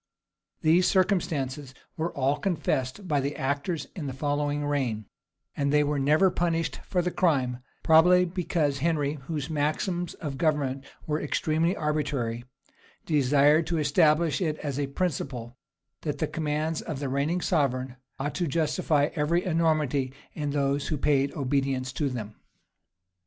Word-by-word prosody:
[*] - - -55
These 170 +3 +4
circumstances 150 -9 0 0.2
were 165 +2 -2
all 140 +1 +1
confessed 175 -2 -1
by 150 -4 +2
the 140 +2 -2
actors 145 +3 -2
in 155 -6 -4
the 135 - -4
following 145 0 -1
reign; 130 -7 -1 0.5
and 140 -1 0
they 150 0 +4
were 145 0 0
never 155 +7 +4
punished 165 -4 -1
for 180 -3 +1
the 180 - -1
crime; 130 -10 +1 0.2
probably 180 +3 +6
because 170 -5 -1
Henry, 150 -1 0
whose 150 -4 -3
maxims 160 +4 -1
of 145 -5 -6
government 140 -5 0 0.2
were 155 0 -1
extremely 160 +4 0
arbitrary, 140 -6 -2 0.6
desired 150 +1 +4
to 170 - 0
establish 155 +1 +3
it 155 -4 0
as 145 -2 -4
a 140 - 0
principle, 135 -7 -3 0.5
that - - -3
the - - 0
commands 155 0 -2
of 155 - -5
the 140 - -2
reigning 140 +6 0
sovereign 130 -8 0 0.2
ought 145 +2 -2
to 175 -2 -1
justify 155 -1 +1
every 170 +3 +1
enormity 155 -6 +1 0.2
in 150 -2 -3
those 140 0 0
who 155 - -1
paid 140 -1 +2
obedience 135 -2 -1
to 145 +1 0
them. 110 -4 -5
150 Hz, 145 wpm, -27 LUFS, 140-165 Hz, 0.6 s, probably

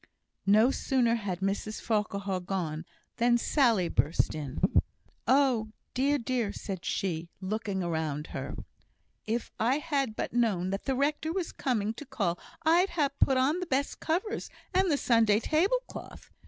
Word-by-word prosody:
No 215 +6 +6
sooner 250 -4 +2
had 200 -6 -2
Mrs 200 +2 -2
Farquhar 200 -3 -1
gone 175 -3 -3 0.3
than 240 0 +4
Sally 235 - +3
burst 160 - +1
in. 145 -3 -5 0.7
"Oh! 255 -6 +3 0.2
dear, 280 +3 +2
dear!" 240 -4 -1
said 190 -4 -6
she, 170 -3 -2
looking 195 -1 -2
around 160 -3 -2
her. - - -4 0.7
"If 230 +2 -2
I 245 +5 +3
had 280 -7 -1
but - - -3
known 205 -7 +1
that 195 - -3
the 270 - +1
rector 295 +4 0
was 360 -1 -2
coming 220 -5 -1
to 295 - -9
call, 175 -9 -1 0.3
I'd 345 +4 +5
ha' 290 -3 +3
put 265 - +4
on 280 +7 +2
the 365 - -4
best 280 -1 -1
covers, 375 +7 -2 0.2
and 375 0 +3
the 290 - +3
Sunday 225 -5 +4
tablecloth! 390 - -1
230 Hz, 150 wpm, -29 LUFS, 195-280 Hz, 0.7 s, No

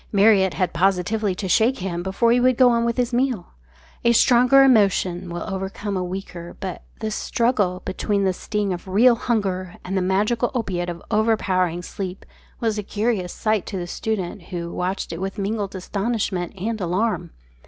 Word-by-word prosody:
Marriott 200 -2 +4
had 180 -2 0
positively 195 +3 +1
to 190 - -4
shake 225 +8 +3
him 180 -2 -3
before 195 +6 +1
he 245 - +4
would 250 0 +3
go 255 -2 +6
on 235 0 +2
with 235 +1 -1
his 245 0 0
meal. 245 -6 -1 0.5
A 235 0 +4
stronger 250 +3 +6
emotion 195 -7 +3
will 170 0 -4
overcome 195 +1 -4
a 185 - -1
weaker, 180 -2 -7
but 190 -3 -5 0.2
this 215 -1 -2
struggle 210 -8 0
between 200 +2 -1
the 190 -1 +2
sting 205 0 -2
of 175 +1 -7
real 225 +7 +5
hunger 195 -6 -2
and 190 +2 -3
the 190 - +2
magical 210 +6 +1
opiate 180 -7 -2
of 170 -1 -7
overpowering 185 -6 +1
sleep 185 0 -6 0.3
was 220 -2 0
a - - 0
curious 205 -3 -1
sight 215 -3 -1
to 195 - -4
the 175 - -3
student, 190 -1 -4
who 170 -2 -5
watched 185 0 -3
it 165 - -6
with 195 +2 -4
mingled 200 -1 -2
astonishment 195 -2 -2
and 215 +3 -3
alarm. 190 +6 -1
195 Hz, 175 wpm, -22 LUFS, 180-225 Hz, 0.5 s, go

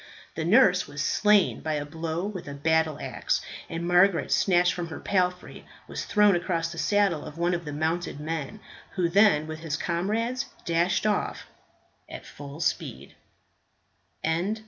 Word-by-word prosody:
The 160 - -3
nurse 185 0 +4
was 145 0 -4
slain 210 +2 +3
by 155 - -2
a 145 -1 -3
blow 160 +3 -4
with 195 -6 -6
a 140 - -6
battle 160 +1 +1
axe, - - -1 0.3
and 170 +1 -4
Margaret, 180 -2 +3
snatched 180 -2 +3
from 175 -2 -4
her 160 - -7
palfrey, 180 -2 -1 0.2
was - - -5
thrown 210 -2 +4
across 170 -2 -1
the 170 - -7
saddle 200 -4 +2
bow - - -9
of 150 - -10
one 175 +1 +1
of 170 -1 -3
the 150 - -5
mounted 160 +1 -2
men, 160 +5 -5 0.3
who 180 -3 +1
then 180 -4 +4
with 155 0 -7
his 160 -2 -3
comrades 215 +10 -1 0.2
dashed 175 +4 +1
off 210 -1 -1 0.6
at - - -9
full 145 +2 -9
speed. - - -3
170 Hz, 160 wpm, -26 LUFS, 160-190 Hz, 0.6 s, nurse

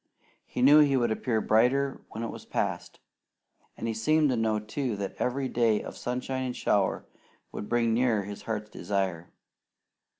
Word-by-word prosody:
He 125 - -2
knew 145 +3 +8
he 140 -3 +4
would 120 -3 +1
appear 110 0 0
brighter 130 +6 +2
when 115 - -6
it 115 - -3
was - - -9
past, - - -3 0.8
and 115 - -4
he 115 - -1
seemed 150 +7 +2
to - - +1
know, 110 -2 +1
too, 110 +3 -3
that 100 -1 -4
every 130 +2 -1
day 115 -4 +2
of - - -8
sunshine 125 +1 -3
and 125 -1 -3
shower 100 -2 +1 0.5
would 105 - -6
bring 115 -1 +2
nearer 115 -3 +2
his 100 +1 -8
heart's 105 -1 -4
desire. 95 -4 -2
115 Hz, 170 wpm, -28 LUFS, 105-130 Hz, 0.8 s, knew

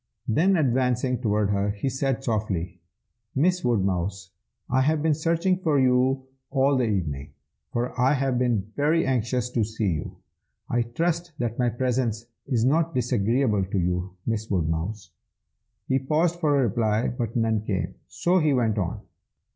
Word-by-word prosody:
Then 180 - +3
advancing 125 -3 +1
toward 105 -3 +1
her, 100 0 +1
he 100 +5 -3
said 135 0 -1
softly, 95 -7 -2 0.5
'Miss 180 +6 +2
Woodmouse. 95 -5 -1 0.4
I 130 +1 +2
have 150 +2 +1
been 160 -1 +3
searching 165 +4 +1
for 155 -6 +2
you 130 +1 +3 0.3
all 135 +1 +2
the 130 -2 +2
evening, 75 -9 -2 0.4
for 120 +1 -2
I 130 +3 +4
have 135 -2 0
been 110 -5 0
very 155 +3 +2
anxious 125 -1 0
to 120 -3 +1
see 110 -1 -1
you. 75 -2 -4 0.5
I 120 - +1
trust 170 +8 -2
that 120 -3 -3
my 125 -1 +3
presence 120 -2 -1 0.2
is 115 -3 +1
not 160 +3 +2
disagreeable 120 -2 +1
to 95 +1 -3
you, 90 +1 -1
Miss 110 -1 -2
Woodmouse?' 90 +3 -2 0.8
He 130 - +2
paused 160 +5 +1
for 150 -4 +2
a 135 - +3
reply, 110 -1 +1
but 115 -2 -4
none 110 -2 +1
came, 105 -3 -2
so 180 +2 +1
he 155 -3 +2
went 115 -5 +1
on. 100 +3 -2
120 Hz, 155 wpm, -25 LUFS, 105-135 Hz, 0.8 s, I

